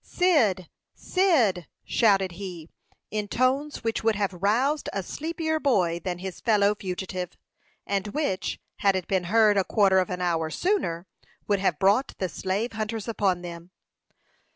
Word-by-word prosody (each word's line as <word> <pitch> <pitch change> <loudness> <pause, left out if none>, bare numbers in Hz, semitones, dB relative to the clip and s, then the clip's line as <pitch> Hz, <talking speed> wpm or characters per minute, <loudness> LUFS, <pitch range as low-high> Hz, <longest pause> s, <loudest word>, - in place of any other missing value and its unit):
"Cyd! 235 - +2 0.3
Cyd!" 250 - +2 0.2
shouted 195 -5 +3
he, 175 -3 -8 0.4
in 210 -1 -2
tones 260 +5 0
which 225 0 -1
would 225 -1 +2
have 200 -2 -1
roused 235 - +1
a 195 - -3
sleepier 315 - -2
boy 180 - +1
than 180 -1 -4
his 185 0 -7
fellow 210 -2 +3
fugitive, 185 -2 -5 0.5
and 200 0 -1
which, 205 -5 -2 0.2
had 195 -1 +2
it 185 -2 -3
been 190 -2 0
heard 215 +2 +4
a 195 - +4
quarter 195 -1 +3
of 185 - 0
an 180 - -3
hour 165 -3 0
sooner, 185 - -1 0.4
would 205 -1 +2
have 185 -5 +1
brought 205 - +2
the 185 - -2
slave 200 +8 -2
hunters 220 -1 -4
upon 195 -5 0
them. 170 0 -8
200 Hz, 155 wpm, -26 LUFS, 185-230 Hz, 0.5 s, heard